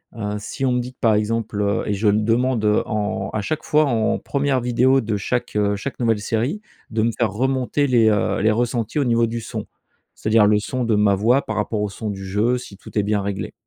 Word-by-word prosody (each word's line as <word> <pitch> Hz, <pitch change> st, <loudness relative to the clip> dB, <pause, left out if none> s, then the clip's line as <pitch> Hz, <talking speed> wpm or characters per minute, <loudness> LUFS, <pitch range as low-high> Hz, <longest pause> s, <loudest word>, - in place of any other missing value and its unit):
Heu, 105 Hz, -2 st, -3 dB
si 135 Hz, +6 st, -4 dB
on 130 Hz, -, +2 dB
me 125 Hz, -, +1 dB
dit 125 Hz, +1 st, -5 dB
que, -, -, -51 dB
par 110 Hz, -2 st, +3 dB
exemple, 110 Hz, 0 st, -1 dB
heu 100 Hz, +1 st, 0 dB
et 105 Hz, -, 0 dB
je 105 Hz, +2 st, 0 dB
me 105 Hz, +1 st, +3 dB
demande, 120 Hz, +1 st, +1 dB
heu, 105 Hz, 0 st, +3 dB
en 105 Hz, -2 st, -2 dB
à 110 Hz, -, -1 dB
chaque 155 Hz, +8 st, -3 dB
fois 155 Hz, 0 st, +3 dB
en 115 Hz, -5 st, +1 dB
1re 140 Hz, -2 st, 0 dB
vidéo 125 Hz, +2 st, +3 dB
de 110 Hz, -2 st, -2 dB
chaque, 120 Hz, +3 st, -3 dB
heu, 105 Hz, -1 st, +1 dB
chaque 130 Hz, +8 st, -6 dB
nouvelle 115 Hz, -3 st, +1 dB
série, 120 Hz, -, -1 dB, 0.3 s
de 110 Hz, -, 0 dB
me 115 Hz, -, +2 dB
faire 115 Hz, -4 st, +1 dB
remonter 130 Hz, +4 st, 0 dB
les, 120 Hz, -3 st, +4 dB
heu, 105 Hz, -2 st, +1 dB
les 110 Hz, -, +3 dB
ressentis 120 Hz, +3 st, -1 dB
au -, -, +3 dB
niveau 115 Hz, -1 st, +2 dB
du 115 Hz, 0 st, -4 dB
son. -, -, -6 dB, 0.5 s
C'est-à-dire 110 Hz, -1 st, +3 dB
le 105 Hz, 0 st, +4 dB
son 125 Hz, +4 st, -3 dB
de 110 Hz, -2 st, +2 dB
ma 105 Hz, -1 st, +3 dB
voix 120 Hz, +8 st, +3 dB
par 110 Hz, -, -5 dB
rapport 105 Hz, 0 st, -1 dB
au 105 Hz, -, -1 dB
son 105 Hz, +2 st, -5 dB
du 95 Hz, -1 st, -7 dB
jeu, 105 Hz, +6 st, +1 dB
si 105 Hz, -5 st, -10 dB
tout 105 Hz, -, -9 dB
est 105 Hz, -, +3 dB
bien 105 Hz, 0 st, 0 dB
réglé. 100 Hz, 0 st, -4 dB
110 Hz, 245 wpm, -21 LUFS, 105-125 Hz, 0.5 s, les